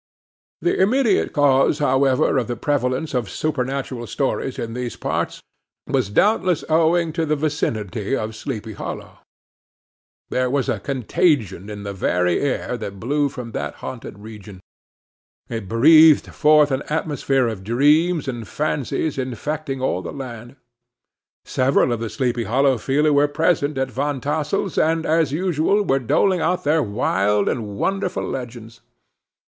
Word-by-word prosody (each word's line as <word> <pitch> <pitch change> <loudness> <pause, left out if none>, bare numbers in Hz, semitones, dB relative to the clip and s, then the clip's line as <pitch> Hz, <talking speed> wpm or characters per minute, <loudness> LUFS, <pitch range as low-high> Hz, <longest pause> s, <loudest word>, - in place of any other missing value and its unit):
The 350 - +1
immediate 225 +1 +2
cause, 140 -1 +3
however, 135 -2 +2
of 120 - -3
the 120 - -3
prevalence 135 +2 -1
of 120 -6 -1
supernatural 130 -3 -3
stories 135 +2 -2
in 115 -1 -4
these 125 0 -4
parts, - - -3 0.4
was - - 0
doubtless 185 - +2
owing 165 +1 +2
to 165 0 -1
the 155 -1 +1
vicinity 115 - -2
of 110 -3 -4
Sleepy 110 -3 -5
Hollow. - - -7 1.1
There 130 0 +1
was 140 0 0
a - - -1
contagion 125 - 0
in 105 -1 -7
the 100 0 -5
very 90 -2 +1
air 135 -3 -1
that 100 -4 -7
blew 145 +6 0
from 125 -4 -8
that - - -4
haunted 115 -4 -7
region; 105 -2 -11 0.9
it 115 -4 -5
breathed 155 +6 +6
forth 150 -1 +4
an 130 +1 0
atmosphere 145 -4 0
of 110 -4 -5
dreams 150 - +2
and 120 -4 -5
fancies 150 +1 -2
infecting 135 +2 -4
all 95 -8 0
the - - -6
land. 120 -2 -8 0.9
Several 130 -1 +2
of 120 - -1
the 115 -1 -4
Sleepy 120 -3 -1
Hollow 135 +1 +2
people 150 +6 +1
were 145 0 +4
present 150 -1 0
at 135 -1 -1
Van 140 +3 -2
Tassel's, 150 +7 -1
and, 160 +1 +1
as 160 -2 +2
usual, 180 +4 +1
were 135 -8 +1
doling 180 - +2
out 180 +2 0
their 155 +2 +2
wild 105 -3 +1
and 105 -4 -2
wonderful 190 - -1
legends. 115 -3 -7
135 Hz, 145 wpm, -21 LUFS, 115-155 Hz, 1.1 s, breathed